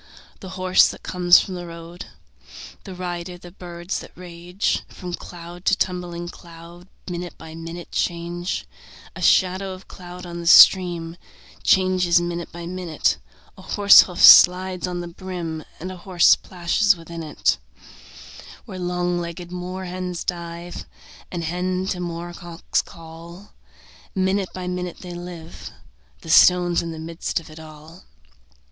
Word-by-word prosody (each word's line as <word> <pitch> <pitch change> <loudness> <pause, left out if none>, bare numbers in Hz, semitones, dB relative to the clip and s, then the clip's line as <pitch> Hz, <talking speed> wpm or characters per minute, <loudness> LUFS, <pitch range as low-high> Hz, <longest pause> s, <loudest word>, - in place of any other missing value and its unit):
The 190 - -9
horse 185 0 +5
that - - -9
comes 175 -1 +5
from 190 - -4
the 175 -1 -6
road. 170 +1 -10 0.8
The 185 - -8
rider, 175 0 -5
the 175 0 -13
birds 175 0 -6
that - - -11
range 180 +2 -3
From 180 -2 -8
cloud 175 0 -9
to 200 - +3
tumbling 175 -2 -3
cloud, 170 +1 -13 0.2
Minute 175 -1 -6
by 160 0 -11
minute 165 +1 -8
change; 175 +1 -3 0.5
A - - -8
shadow 190 +1 +2
of 185 0 -13
cloud 180 -1 -10
on 170 -1 -7
the 170 - -6
stream 175 -2 +6 0.4
Changes 185 -2 +3
minute 175 0 -4
by 170 0 -8
minute; 165 - -1 0.4
A - - -14
horse 200 -1 +7
hoof 180 -2 -5
slides 185 0 +7
on 175 -1 -4
the 175 - -6
brim, 170 -3 -6 0.2
And 185 +3 -6
a 185 - -9
horse 180 0 +4
plashes 185 +3 +1
within 165 0 -8
it 155 -2 0 1.1
Where 185 - -8
long 180 0 -1
legged 175 +1 -7
moor 180 +1 -5
hens 180 -1 -5
dive, 170 0 -6 0.5
And 175 -2 -4
hens 180 +3 -2
to 180 - -3
moor 175 0 -5
cocks 170 0 -3
call. 170 +2 -13 0.6
Minute 190 0 0
by 185 -1 -7
minute 180 -1 -5
they 180 -1 -8
live: 175 -2 -9 0.5
The 160 - -5
stone's 175 0 +5
in 170 - -5
the 160 - -8
midst 165 +2 -3
of 160 -1 -13
all. 155 +2 -13
175 Hz, 145 wpm, -22 LUFS, 170-180 Hz, 1.1 s, horse